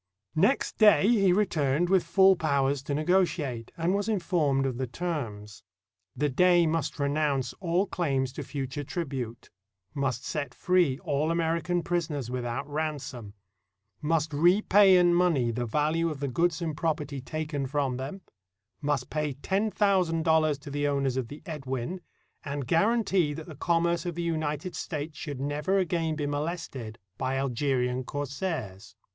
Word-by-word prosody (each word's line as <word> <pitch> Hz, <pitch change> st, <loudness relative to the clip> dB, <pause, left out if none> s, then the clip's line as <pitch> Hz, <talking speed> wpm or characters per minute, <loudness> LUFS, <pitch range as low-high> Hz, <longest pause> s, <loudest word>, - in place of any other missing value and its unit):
Next 200 Hz, -, +1 dB
day 210 Hz, -2 st, +6 dB
he 200 Hz, -5 st, +4 dB
returned 175 Hz, -5 st, +1 dB
with 190 Hz, 0 st, +3 dB
full 190 Hz, +3 st, +5 dB
powers 140 Hz, -4 st, +1 dB
to 140 Hz, +1 st, -3 dB
negotiate, 155 Hz, -7 st, 0 dB
and 170 Hz, +2 st, +1 dB
was 205 Hz, +2 st, -1 dB
informed 160 Hz, -9 st, +1 dB
of 130 Hz, -3 st, -2 dB
the 130 Hz, -, -1 dB
terms. 115 Hz, -9 st, -5 dB, 0.5 s
The 150 Hz, -, +1 dB
Dey 175 Hz, +5 st, +4 dB
must 165 Hz, 0 st, -1 dB
renounce 140 Hz, -3 st, 0 dB
all 180 Hz, +1 st, +1 dB
claims 135 Hz, -9 st, -1 dB
to -, -, -5 dB
future 140 Hz, 0 st, -4 dB
tribute; 135 Hz, -7 st, -5 dB, 0.4 s
must 135 Hz, -4 st, -2 dB
set 145 Hz, -2 st, -3 dB
free 180 Hz, -8 st, +2 dB
all 145 Hz, +2 st, 0 dB
American 170 Hz, +1 st, 0 dB
prisoners 150 Hz, -8 st, -2 dB
without 125 Hz, +1 st, -3 dB
ransom; 145 Hz, -8 st, -4 dB, 0.7 s
must 160 Hz, 0 st, 0 dB
repay 190 Hz, +4 st, +5 dB
in 175 Hz, -1 st, +5 dB
money 165 Hz, -9 st, +2 dB
the 120 Hz, +1 st, -3 dB
value 155 Hz, +7 st, +1 dB
of 150 Hz, -3 st, -5 dB
the 140 Hz, -, -2 dB
goods 170 Hz, +6 st, 0 dB
and 160 Hz, -3 st, -2 dB
property 150 Hz, -3 st, -2 dB
taken 150 Hz, -1 st, -3 dB
from 135 Hz, -2 st, -1 dB
them; 135 Hz, +9 st, -6 dB, 0.6 s
must 145 Hz, -1 st, -1 dB
pay 150 Hz, -2 st, -1 dB
ten 195 Hz, +10 st, -1 dB
thousand 185 Hz, -6 st, +2 dB
dollars 155 Hz, -2 st, +3 dB
to 140 Hz, 0 st, -10 dB
the 145 Hz, +1 st, 0 dB
owners 140 Hz, -2 st, 0 dB
of 130 Hz, -3 st, -2 dB
the 145 Hz, +5 st, -10 dB
Edwin, 145 Hz, +1 st, -4 dB, 0.4 s
and 140 Hz, -2 st, -4 dB
guarantee 195 Hz, -, +2 dB
that 155 Hz, +1 st, -7 dB
the 160 Hz, -, -9 dB
commerce 170 Hz, +3 st, 0 dB
of 175 Hz, -, -3 dB
the 170 Hz, -, -3 dB
United 155 Hz, 0 st, -2 dB
States 155 Hz, -1 st, -4 dB
should 145 Hz, -4 st, -6 dB
never 145 Hz, +7 st, 0 dB
again 165 Hz, -4 st, 0 dB
be 150 Hz, -1 st, -2 dB
molested 145 Hz, -6 st, -4 dB, 0.2 s
by 135 Hz, 0 st, -1 dB
Algerian 130 Hz, -1 st, 0 dB
corsairs. 130 Hz, -, -4 dB
150 Hz, 150 wpm, -28 LUFS, 135-175 Hz, 0.7 s, day